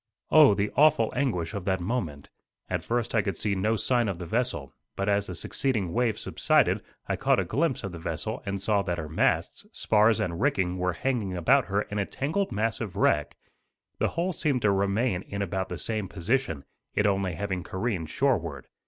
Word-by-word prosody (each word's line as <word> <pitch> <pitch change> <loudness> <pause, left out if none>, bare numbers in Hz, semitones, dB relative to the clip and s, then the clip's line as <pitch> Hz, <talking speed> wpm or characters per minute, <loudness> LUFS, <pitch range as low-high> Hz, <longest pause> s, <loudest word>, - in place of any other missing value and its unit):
Oh, 150 -9 +7
the 100 +1 -1
awful 140 -7 +4
anguish 105 -12 -1
of 100 -3 -5
that 95 -1 +1
moment! 85 - -3 0.4
At - - -1
first 120 0 -1
I 110 - +4
could 100 -4 -3
see 105 - 0
no 105 +4 +1
sign 120 +1 +1
of 95 -4 -2
the 90 - -6
vessel, 115 - -2 0.2
but 100 - -2
as 100 0 +2
the 90 - -5
succeeding 105 - -1
wave 120 -2 +1
subsided - - +2 0.3
I - - 0
caught - - +2
a - - 0
glimpse 145 -2 0
of 100 - -4
the 85 - -8
vessel 85 +8 -3
and 100 -3 -3
saw 100 +1 +2
that 90 -3 -2
her 80 -2 -4
masts, 80 - 0
spars 110 0 +3
and 85 +1 -2
rigging 95 -10 +1
were 90 0 0
hanging 105 -3 -1
about 125 +9 +4
her 100 +1 0
in 105 - -4
a 100 - -1
tangled 160 +9 -1
mass 110 +3 -1
of 105 -6 -5
wreck. - - +1 0.6
The - - +2
hull 175 +3 -1
seemed 140 -6 0
to 105 - +4
remain 100 +1 +1
in 100 +1 -4
about 95 0 -3
the - - -4
same 110 -3 -2
position, 90 - -1 0.3
it 105 - +2
only 95 -2 +1
having 95 +1 -2
careened 95 -4 -3
shoreward. 85 - 0
100 Hz, 200 wpm, -27 LUFS, 90-120 Hz, 0.6 s, Oh